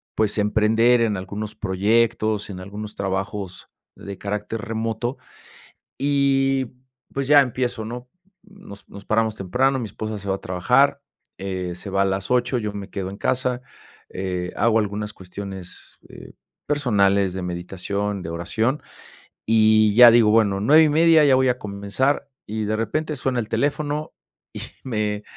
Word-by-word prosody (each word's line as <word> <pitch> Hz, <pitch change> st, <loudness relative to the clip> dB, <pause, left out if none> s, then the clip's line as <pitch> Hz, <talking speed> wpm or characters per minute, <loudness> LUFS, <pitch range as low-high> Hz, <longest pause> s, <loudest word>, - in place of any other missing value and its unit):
pues 110 Hz, -1 st, 0 dB
emprender 110 Hz, +3 st, +3 dB
en 105 Hz, -4 st, +1 dB
algunos 105 Hz, +3 st, -6 dB
proyectos, 110 Hz, +2 st, +1 dB
en 95 Hz, -2 st, -7 dB
algunos 105 Hz, +2 st, -8 dB
trabajos 95 Hz, -1 st, -4 dB, 0.3 s
de 100 Hz, -1 st, -8 dB
carácter 105 Hz, +2 st, -4 dB
remoto 115 Hz, +2 st, -3 dB, 0.8 s
y 135 Hz, -2 st, +2 dB, 0.5 s
pues 140 Hz, -1 st, -2 dB
ya 145 Hz, 0 st, +7 dB
empiezo, 125 Hz, -3 st, -2 dB
¿no?, 120 Hz, +2 st, -7 dB, 0.3 s
nos 195 Hz, -, -14 dB
nos 100 Hz, 0 st, -11 dB
paramos 110 Hz, 0 st, 0 dB
temprano, 130 Hz, +8 st, +1 dB
mi 115 Hz, -, -3 dB
esposa 110 Hz, 0 st, -5 dB
se 100 Hz, 0 st, -8 dB
va 95 Hz, -, +1 dB
a -, -, -14 dB
trabajar, 125 Hz, +11 st, +2 dB, 0.4 s
eh, 95 Hz, -2 st, -4 dB
se 95 Hz, +2 st, -8 dB
va 100 Hz, 0 st, +2 dB
a -, -, +3 dB
las 95 Hz, +2 st, -2 dB
8, 125 Hz, 0 st, +1 dB
yo 105 Hz, -2 st, -3 dB
me 100 Hz, -1 st, -7 dB
quedo 95 Hz, -2 st, -4 dB
en 100 Hz, -, -8 dB
casa, 125 Hz, +3 st, -1 dB, 0.5 s
eh, 90 Hz, -1 st, -4 dB
hago 115 Hz, +1 st, +3 dB
algunas 105 Hz, 0 st, -3 dB
cuestiones, 95 Hz, 0 st, -10 dB
eh, -, -, -12 dB, 0.3 s
personales 100 Hz, -9 st, +2 dB
de 95 Hz, -, -4 dB
meditación, 95 Hz, +3 st, -3 dB
de 80 Hz, -, -6 dB
oración, 110 Hz, -, -1 dB, 0.6 s
y 110 Hz, -1 st, +4 dB
ya: 120 Hz, +1 st, +10 dB
"Digo 115 Hz, -2 st, +5 dB
bueno, 100 Hz, -3 st, +3 dB
9:30 155 Hz, +4 st, +5 dB
ya 135 Hz, -2 st, +5 dB
voy 130 Hz, 0 st, +3 dB
a 125 Hz, -, -1 dB
comenzar" 105 Hz, +8 st, -1 dB, 0.2 s
y 110 Hz, +1 st, -3 dB
de 110 Hz, +1 st, 0 dB
repente 150 Hz, +8 st, -2 dB
suena 130 Hz, -1 st, -1 dB
el 110 Hz, -, -4 dB
teléfono 145 Hz, +4 st, -1 dB, 0.4 s
y -, -, -6 dB, 0.2 s
me 105 Hz, -4 st, -2 dB
110 Hz, 150 wpm, -22 LUFS, 100-125 Hz, 0.8 s, ya